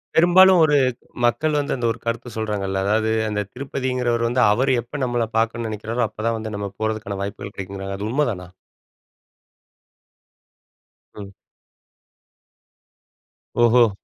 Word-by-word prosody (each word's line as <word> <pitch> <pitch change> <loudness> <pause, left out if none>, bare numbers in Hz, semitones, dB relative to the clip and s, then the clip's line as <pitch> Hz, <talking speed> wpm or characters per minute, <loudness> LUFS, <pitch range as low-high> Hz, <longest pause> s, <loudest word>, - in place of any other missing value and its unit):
பெரும்பாலும் 180 +2 +7
ஒரு 150 -1 +3 0.5
மக்கள் 150 +6 +1
வந்து 145 - -1
அந்த 120 -3 -3
ஒரு - - -6
கருத்த 115 +1 -3
சொல்றாங்கல்ல. 100 -3 -2
அதாவது 110 +2 +1 0.2
அந்த 105 -1 -1
திருப்பதிங்கிறவர் 125 -3 -1
வந்து, 120 +2 +1
"அவர் 130 +5 +1
எப்ப 140 +5 -7
நம்மள 120 -2 0
பார்க்கணும்ன்னு 115 0 0
நெனைக்கிறாரோ, 110 +3 -2
அப்பதான் 115 +2 -2
வந்து 110 -1 -6
நம்ம 100 -1 -4
போறதுக்கான 110 -3 -3
வாய்ப்புகள் 100 0 -6
கிடைக்குங்கிறாங்க." 95 0 -6
அது 105 +2 -4
உண்ம 150 +3 +2
தானா? 90 -2 -8 2.7
ம். 100 -2 -9 2.3
ஓஹோ! 120 0 +5
115 Hz, 120 wpm, -22 LUFS, 105-125 Hz, 2.7 s, பெரும்பாலும்